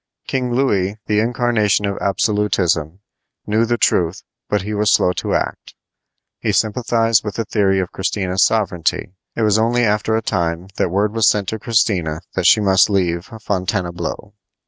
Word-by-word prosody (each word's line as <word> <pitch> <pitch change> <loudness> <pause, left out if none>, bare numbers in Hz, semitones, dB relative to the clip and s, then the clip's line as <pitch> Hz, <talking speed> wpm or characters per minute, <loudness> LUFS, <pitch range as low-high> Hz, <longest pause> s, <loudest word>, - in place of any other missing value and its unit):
King 125 -2 -2
Louis, 105 -6 0
the 105 0 +1
incarnation 115 -3 +1
of 100 0 -2
absolutism, 95 -5 0 0.4
knew 110 +2 +1
the 120 +1 0
truth, 85 -5 +1 0.3
but 105 -2 0
he 105 +2 -4
was 105 0 +1
slow 90 - +3
to - - -2
act. - - -4 0.6
He - - -1
sympathized 115 0 +1
with 105 -2 -5
the 115 - -2
theory 95 -3 +1
of 90 -1 -3
Christina's 95 -1 -1
sovereignty. 95 -5 0 0.2
It 115 - -1
was 105 0 +3
only 120 +2 +2
after 105 0 +1
a 110 - -1
time 85 -2 -2
that - - +1
word 100 +4 0
was 115 -3 +4
sent 100 -2 0
to 110 - -4
Christina 95 -9 0
that 95 -2 +1
she - - +6
must 95 -1 +4
leave 90 -3 0
Fontainebleau. 95 -3 -4
105 Hz, 165 wpm, -19 LUFS, 95-110 Hz, 0.6 s, she